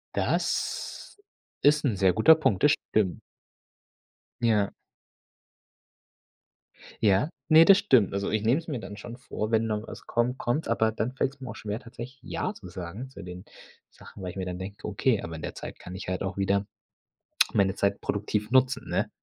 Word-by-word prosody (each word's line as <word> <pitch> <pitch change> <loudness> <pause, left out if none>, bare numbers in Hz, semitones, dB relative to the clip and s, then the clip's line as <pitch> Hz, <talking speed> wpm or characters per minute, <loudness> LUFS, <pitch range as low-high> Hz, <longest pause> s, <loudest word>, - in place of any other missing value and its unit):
Das - - -2 0.5
ist 150 +1 +4
'n 115 - +1
sehr 95 -2 +4
guter 155 - +7
Punkt, 105 -12 +1
das 150 - +7 0.2
stimmt. 95 -5 +1 1.2
Ja. 110 -4 +2 2.3
Ja, 105 +7 +4 0.2
ne, 160 +1 +8
das 195 +1 +8
stimmt. 130 - +4
Also, 100 0 -1
ich 110 -1 0
nehme 120 +8 +3
es 165 - -10
mir 135 -5 -2
dann 105 - -8
schon 115 +3 -9
vor, 110 -3 -4
wenn 115 0 +2
noch 110 0 -2
was - - -10
kommt, 120 +2 0
kommt 130 +7 -1
es, - - -6
aber 110 -1 +2
dann 110 +3 -2
fällt 130 +1 -1
es 135 - -23
mir 130 - -6
auch 110 - -6
schwer 105 +3 -4
tatsächlich 120 +2 -9
„ja“ 185 +8 -3
zu 95 - -11
sagen 90 +9 -7
zu - - -11
den 90 0 -8 0.5
Sachen, 95 - -13
weil 90 - -3
ich 95 - -11
mir 95 - -2
dann 90 -1 -4
denke: 95 +3 -7
„Okay, 105 +2 +1
aber 80 0 -6
in 80 - -8
der - - -5
Zeit - - -8
kann 90 - -9
ich 95 - -7
halt 95 +1 -2
auch 95 0 -4
wieder 100 +1 +1 0.9
meine 95 -1 +2
Zeit 100 0 0
produktiv 105 +1 -2
nutzen“, 130 0 +3
ne? - - 0
110 Hz, 190 wpm, -27 LUFS, 100-130 Hz, 2.3 s, ne